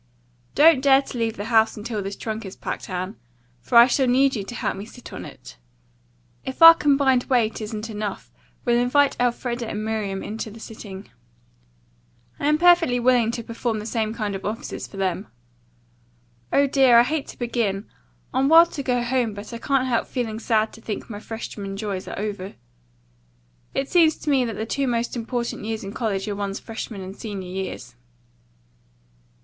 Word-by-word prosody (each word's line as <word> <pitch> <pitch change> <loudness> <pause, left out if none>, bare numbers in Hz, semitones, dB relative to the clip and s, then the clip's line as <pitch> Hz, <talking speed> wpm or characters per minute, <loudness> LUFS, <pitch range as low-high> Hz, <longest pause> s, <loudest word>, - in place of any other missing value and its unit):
Don't 305 -2 +6
dare 275 0 +5
to 255 - -8
leave 225 -1 -1
the 205 - -4
house 220 0 +4
until 215 0 -4
this 195 +1 -5
trunk 220 +1 -5
is 190 -2 -8
packed, - - -6
Anne, 185 +3 -4 0.4
for 235 - +1
I 235 - +11
shall 265 +1 +1
need 265 +2 +3
you 205 - -3
to 240 +5 -8
help - - -2
me 195 - -6
sit 230 +3 -12
on - - -7
it. - - -12 0.9
If 265 +5 -1
our 330 0 +13
combined 275 -5 +2
weight 230 -5 +1
isn't 215 0 -5
enough, 210 -2 -5 0.3
we'll 240 -1 +3
invite 275 +3 +3
Elfreda 240 -1 -1
and 215 0 -4
Miriam 210 -3 -2
in 220 +2 -6
to 220 - -4
the 220 +2 -12
sitting. 205 -3 -9 1.3
I 285 - 0
am 300 0 +4
perfectly 340 -7 +5
willing 245 -2 +3
to 235 0 -3
perform 230 0 -3
the 210 - -6
same 220 -1 -1
kind 215 -3 -3
offices 215 +3 -5
for 195 - -12
them. 190 +1 -1 1.2
Oh, 280 - +4
dear, 265 -3 +5
I 235 - +8
hate 290 +3 -2
to - - -11
begin. 225 -4 -1 0.5
I'm 265 +2 +2
wild 330 +1 +7
to 280 - -4
go 250 -2 0
home, 240 -3 0
but 205 +4 -9
I 230 - -5
can't 270 +1 +1
help 245 -3 0
feeling 225 -4 -3
sad 220 -1 +1
to 225 - -13
think 220 +1 -5
my 205 - -6
freshman 205 -3 -6
joys 200 -3 -4
are - - -6
over. 200 -2 -4 1.2
It 270 0 0
seems 325 -2 +4
to 300 - -2
me 265 -3 +3
that 225 -2 -4
the 220 - -3
two 275 +4 -1
most 240 0 -1
important 235 -1 -3
years 220 0 -4
in 195 +1 -6
college 210 -5 -2
are 205 - -2
one's 200 0 -3
freshman 225 -2 -7
and 190 +1 -8
senior 200 -5 -6
years. 185 -10 -5
230 Hz, 190 wpm, -23 LUFS, 210-255 Hz, 1.3 s, our